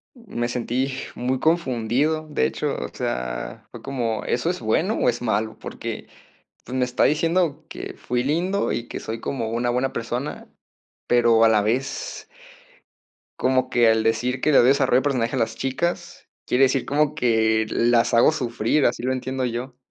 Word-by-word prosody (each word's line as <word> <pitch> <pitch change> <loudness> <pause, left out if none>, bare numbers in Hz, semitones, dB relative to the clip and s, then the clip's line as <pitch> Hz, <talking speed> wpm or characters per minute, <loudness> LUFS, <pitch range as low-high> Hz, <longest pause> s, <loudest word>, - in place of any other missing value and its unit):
Me 200 - -4
sentí 125 +2 -1 0.2
muy 130 +1 -1
confundido, 155 0 +1
de 145 - +1
hecho, - - -2
o - - -4
sea, - - -4
fue - - -10
como, 120 -5 -2
¿eso 125 +7 0
es 180 - -2
bueno 155 - +1
o - - +1
es 120 -1 +1
malo? 110 -1 -1
Porque, - - -6 0.6
pues, 125 - -5
me 125 - +3
está 125 0 +1
diciendo 165 +1 +1
que - - -7
fui 125 0 -2
lindo, 175 +9 0
y 115 +2 -3
que - - -6
soy 115 +1 -5
como 115 -4 -3
una 120 +1 0
buena 125 +2 0
persona, 120 +5 -4 0.6
pero 120 -2 +4
a - - +7
la 110 -2 +3
vez 135 - -2 1.1
como 130 0 +2
que 120 -2 +4
al 110 0 +3
decir 120 +3 0
que 155 - +3
"le 140 - +5
doy 120 - +6
desarrollo 135 -2 +4
de - - +3
personaje 130 -3 0
a - - 0
las 115 -1 -1
chicas", 170 +8 -3 0.2
quiere 130 +2 +3
decir 130 -1 0
como 150 +1 +1
que 110 -5 +2
las 120 0 +2
hago 120 +6 +5
sufrir, 120 +1 0
así - - +1
lo 130 +2 0
entiendo 130 0 -2
yo. 125 +1 -4
125 Hz, 180 wpm, -23 LUFS, 115-140 Hz, 1.1 s, a